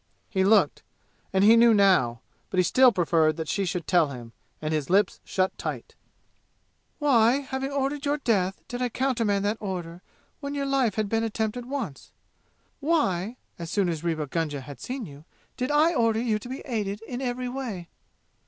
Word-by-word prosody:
He 190 -3 +2
looked, 210 +3 +3 0.5
and 190 0 +2
he 220 +3 +8
knew 230 -1 +6
now. 180 - +3 0.3
But - - -4
he 185 - +5
still 255 +7 +5
preferred 165 -5 +2
that 160 -1 -4
she 200 +3 0
should 175 -2 -3
tell 175 -4 +3
him, 120 -4 -9 0.3
and 155 0 -2
his 150 -3 -2
lips 195 +2 +2
shut 185 0 -1
tight. - - -5 1.0
"Why, 260 -2 +4
having 265 0 -4
ordered 280 +1 -1
your 290 0 +1
death, 195 -9 0
did 245 -2 -5
I 250 - +1
countermand 230 -6 0
the 210 +2 0
order 180 -4 -5 0.4
when 285 0 -5
your 280 -1 -1
life 270 -6 +1
had 215 -1 0
been 225 +2 0
attempted 225 +2 -3
once? 255 - -5 0.7
Why, 250 - 0 0.2
as 170 -1 -6
soon 195 -1 +1
as 165 -2 -3
Rewa 160 -3 -1
Gunga 145 -1 -2
had 135 0 -10
seen 255 -2 -5
you, 145 -2 -12 0.3
did 255 0 -2
I 305 +3 +4
order 230 -5 +2
you 225 -3 0
to 245 - -10
be 260 - -6
aided 210 -3 -3
in 245 +2 -6
every 250 -1 -2
way?" 245 -9 -5
215 Hz, 180 wpm, -26 LUFS, 175-255 Hz, 1.0 s, he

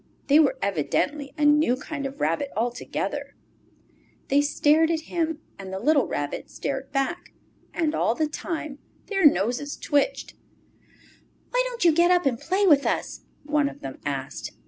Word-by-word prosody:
They 290 +2 +5
were 280 -4 +3
evidently 270 - -1
a 300 - +2
new 295 -3 +4
kind 280 +1 -5
of 275 - -10
rabbit 165 - 0
altogether. 240 +2 -3
Summer - - -36
Days - - -35
They 280 +1 +4
stared 300 +2 +3
at 325 -1 0
him, 325 -1 -2 0.2
and 190 -1 -7
the 190 - -3
little 285 +5 +3
Rabbit 145 0 -4
stared 270 -1 -4
back. 275 -1 -2 0.4
And 315 -2 0
all 230 - +1
the 310 - +1
time 305 -2 -5 0.3
their 390 -6 +5
noses 250 +6 0
twitched. 290 +13 0 1.2
"Why - - +3
don't 480 -6 -3
you 335 - +7
get 340 +3 +4
up 360 -2 +3
and 250 -4 +1
play 380 +4 +1
with 295 -6 +5
us?" - - -2 0.2
one 295 -1 +1
of - - -13
them 135 -1 -7
asked. 135 -1 -4
290 Hz, 170 wpm, -25 LUFS, 250-320 Hz, 1.2 s, you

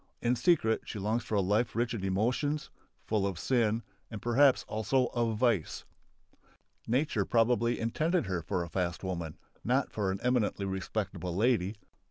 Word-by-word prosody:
In 120 +1 +1
secret 120 -5 +2
she - - -6
longs 110 +4 -1
for 110 - -3
a 100 - +3
life 105 +5 +1
rich 120 +1 0
in 105 -5 -4
emotions, 120 +10 0 0.3
full 105 -3 +1
of 95 -3 -4
sin 115 0 +1 0.3
and 110 - -6
perhaps 130 +4 +4
also 120 +4 0
of 115 -3 0
vice. 110 -8 0 1.0
Nature 125 -3 +1
probably 120 +2 +2
intended 155 +9 0
her 95 -3 -2
for 85 +2 -2
a - - -6
fast 90 -2 -2
woman, 85 -4 -4 0.3
not 130 +3 +1
for 100 -3 -1
an 95 +1 -2
eminently 120 -5 +1
respectable 95 -2 -3
lady. 105 -2 +2
110 Hz, 160 wpm, -30 LUFS, 95-120 Hz, 1.0 s, perhaps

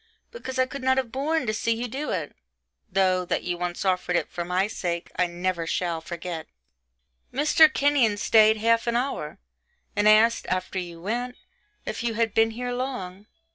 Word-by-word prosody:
because 265 - -6
I 260 - +4
could 275 +1 -7
not 260 0 +2
have 255 -4 -1
borne 295 +3 0
to 215 - -1
see 230 +1 0
you 240 +2 -3
do 275 +6 -4
it; - - -3 0.6
though, 185 -1 +2
that 175 - -2
you 175 - -2
once 175 +2 -4
offered 180 -1 +1
it - - 0
for 175 - -3
my 180 +2 +1
sake, 175 -5 -4
I 180 - +2
never 175 -1 -2
shall 170 -1 -1
forget. 170 -1 -6 0.8
Mr. 305 +3 +5
Kenyon 275 -8 +2
stayed 220 +1 +5
half 230 +2 +2
an 235 - +1
hour, 240 - -2 0.6
and 205 +1 +4
asked, 225 +2 +4
after 185 +1 -2
you 170 -2 -7
went, 240 +7 -3 0.5
if - - -4
you 235 -2 -1
had 225 -1 0
been 225 0 +4
here 245 +2 -4
long. 210 -7 -5
215 Hz, 180 wpm, -25 LUFS, 180-250 Hz, 0.8 s, Mr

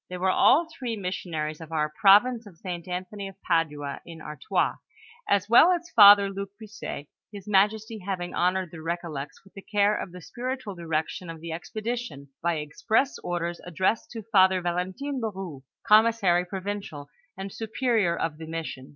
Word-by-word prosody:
They 180 - -5
were 185 +1 +2
all 320 - +5
three 255 -9 -5
missionaries 165 -5 -4
of 160 0 -10
our 150 -1 -1
province 225 +4 +5
of 180 -5 -15
St. 175 -1 -6
Anthony 185 +3 -5
of 195 0 -12
Padua, 150 -4 -1
in 165 -1 -11
Artois, 155 +4 -1 0.5
as 200 -1 +2
well 240 +10 +7
as 345 -1 -2
Father 205 -2 +9
Luke 195 0 -5
Buisset, 215 -9 -7 0.3
his 200 -1 -10
majesty 210 +2 +2
having 185 -2 -4
honored 180 -1 0
the 170 - -9
Kecollects 160 -3 -5
with 195 - -21
the 195 - -10
care 205 +1 +2
of 185 - -5
the 180 - -10
spiritual 250 - -5
direction 165 0 -3
of 165 -1 -7
the 165 +1 -7
expedition 215 - -5
by 170 0 +1
express 215 - 0
orders 175 -1 -3
addressed 185 +5 -1
to 225 -2 -6
Father 190 -3 +4
Val 175 -1 -2
entine 260 +10 -4
le 220 -1 -1
Koux, 180 -9 -8 0.2
commissary 210 -5 +4
provincial, 190 -6 -5 0.3
and 195 0 -6
superior 225 -5 0
of 160 -1 -3
the 160 - -8
mission. 160 -5 -6
190 Hz, 170 wpm, -26 LUFS, 165-215 Hz, 0.5 s, Father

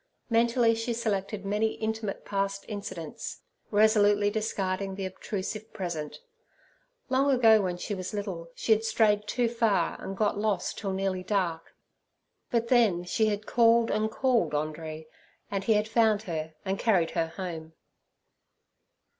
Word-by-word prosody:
Mentally 230 0 +4
she 225 +1 -2
selected 205 -3 -2
many 210 +2 +1
intimate 220 -2 -4
past 195 0 -2
incidents, 205 +2 -6 0.3
resolutely 205 -1 +4
discarding 195 -3 -2
the 195 0 -4
obtrusive 205 +3 -5
present. 170 - -5 0.9
Long 265 +2 +3
ago, 225 -5 +6
when 180 -2 -2
she 205 - -4
was 185 -2 -4
little, 195 -5 -5
she - - -2
had 220 0 +4
strayed 210 -2 +2
too 245 +1 +1
far 225 -7 +1
and 195 0 -5
got 210 -1 +1
lost 205 -4 -1
till 200 -2 -3
nearly 190 -1 -1
dark, 180 -4 -2 0.7
but 235 -1 0
then 220 -9 +4
she 215 +5 +1
had 210 0 -2
called 230 -1 +4
and 215 +1 +1
called 240 - +1
Andree, 155 +1 -4 0.5
and 195 -1 -2
he 225 - +4
had 210 0 +1
found 220 -2 +3
her 160 -4 -4
and 195 0 -1
carried 185 -8 +2
her 165 - 0
home. 165 -2 -6
205 Hz, 145 wpm, -28 LUFS, 185-225 Hz, 0.9 s, ago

